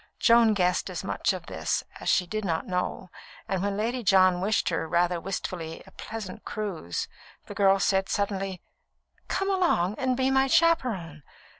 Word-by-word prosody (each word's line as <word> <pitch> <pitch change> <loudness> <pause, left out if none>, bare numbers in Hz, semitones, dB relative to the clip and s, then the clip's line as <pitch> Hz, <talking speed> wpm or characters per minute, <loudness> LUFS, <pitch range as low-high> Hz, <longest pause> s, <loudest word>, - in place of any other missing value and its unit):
Joan 230 -2 +5
guessed 180 -2 +1
as - - -5
much - - 0
of - - -6
this - - -2 0.2
as - - -3
she 180 - +3
did 215 +4 -4
not 165 -4 -1
know, 180 0 -3 0.4
and 190 -2 -1
when 200 0 -1
Lady 235 +4 -1
John 185 -4 +4
wished 205 +3 +1
her, 165 -1 -2
rather 175 +1 +1
wistfully, 170 -3 -5
a - - -16
"pleasant 215 -2 -7
cruise," 185 - -4 0.4
the - - -8
girl 195 -1 +4
said 195 0 +1
suddenly: 195 -2 -2 0.6
"Come 390 +1 -1
along 335 - +2
and 255 -1 0
be 265 0 +2
my 265 0 +3
chaperon! 235 - +1
195 Hz, 165 wpm, -27 LUFS, 180-225 Hz, 0.6 s, Joan